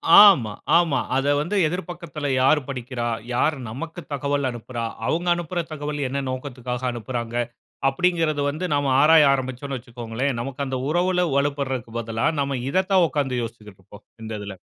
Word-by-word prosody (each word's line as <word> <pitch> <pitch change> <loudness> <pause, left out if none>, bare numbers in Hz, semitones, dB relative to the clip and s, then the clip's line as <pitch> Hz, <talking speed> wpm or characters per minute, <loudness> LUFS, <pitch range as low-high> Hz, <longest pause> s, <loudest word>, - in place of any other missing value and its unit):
ஆமா, 185 - +8 0.3
ஆமா. 170 -4 +2 0.2
அத 135 +1 0
வந்து 170 +7 -2
எதிர் 180 +2 -4
பக்கத்துல 155 -4 -5
யார் 135 +4 +5
படிக்கிறா? 125 -2 -4 0.3
யார் 150 +5 +2
நமக்கு 165 +9 -6
தகவல் 140 -1 0
அனுப்புறா? 120 0 -5 0.2
அவுங்க 175 +2 0
அனுப்புற 175 +1 -2
தகவல் 150 -1 -4
என்ன 140 +1 -2
நோக்கத்துக்காக 130 -1 -5
அனுப்புறாங்க? 120 0 -4 0.5
அப்டிங்கிறது 165 0 +1
வந்து, 155 +6 -3
நாம 145 -2 +1
ஆராய 155 0 +7
ஆரம்பிச்சோன்னு 130 +1 -3
வச்சிக்கோங்களேன், 120 +2 -3
நமக்கு 135 +3 -4
அந்த 130 -1 -2
உறவுல 180 +2 +2
வலுப்படுறதுக்கு 135 -5 -1
பதிலா, 115 +2 -2 0.2
நம்ம 140 -1 -1
இத 185 +6 +2
தான் 185 -2 +6
உக்காந்து 135 -5 -1
யோசிச்சிகிட்ருப்போம். 105 -4 -11 0.2
இந்த 110 - -6
இதில. 100 -2 -7
140 Hz, 145 wpm, -23 LUFS, 120-155 Hz, 0.5 s, ஆமா